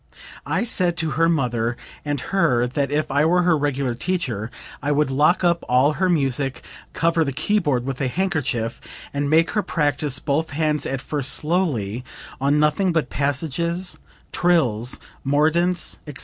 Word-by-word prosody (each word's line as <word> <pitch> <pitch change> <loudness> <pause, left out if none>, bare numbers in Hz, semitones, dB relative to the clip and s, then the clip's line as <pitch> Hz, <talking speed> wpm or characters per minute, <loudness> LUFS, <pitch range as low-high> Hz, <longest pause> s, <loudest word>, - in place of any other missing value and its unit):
I - - 0
said 180 -7 +1
to 160 -2 -1
her 165 +1 +2
mother 120 -6 0 0.3
and 145 -1 -2
her 145 -11 +3
that 135 +2 -1
if 150 0 -1
I 140 +2 +3
were 180 +3 +3
her 175 -2 +4
regular 140 -4 -1
teacher, 120 - -2 0.3
I 145 0 -1
would 145 -1 +1
lock 150 +7 +3
up 170 -1 +2
all 130 +4 +4
her 185 +3 0
music, 135 -4 0 0.3
cover 165 0 +2
the 140 - -2
keyboard 145 -5 0
with 135 -1 -4
a 135 - +1
handkerchief, 140 -8 -1 0.3
and 140 0 -1
make 160 +2 +3
her 215 - +1
practice 145 -5 0
both 150 +3 -1
hands 150 0 0
at 135 -1 -3
first 140 -2 -1
slowly 140 - -1 0.4
on 140 +2 +3
nothing 150 +5 +2
but 160 -6 -1
passages, 165 +6 -2 0.3
trills, 130 -10 +1 0.3
mordents, 160 +6 +2
etc. 145 -3 -8
145 Hz, 160 wpm, -22 LUFS, 135-170 Hz, 0.4 s, her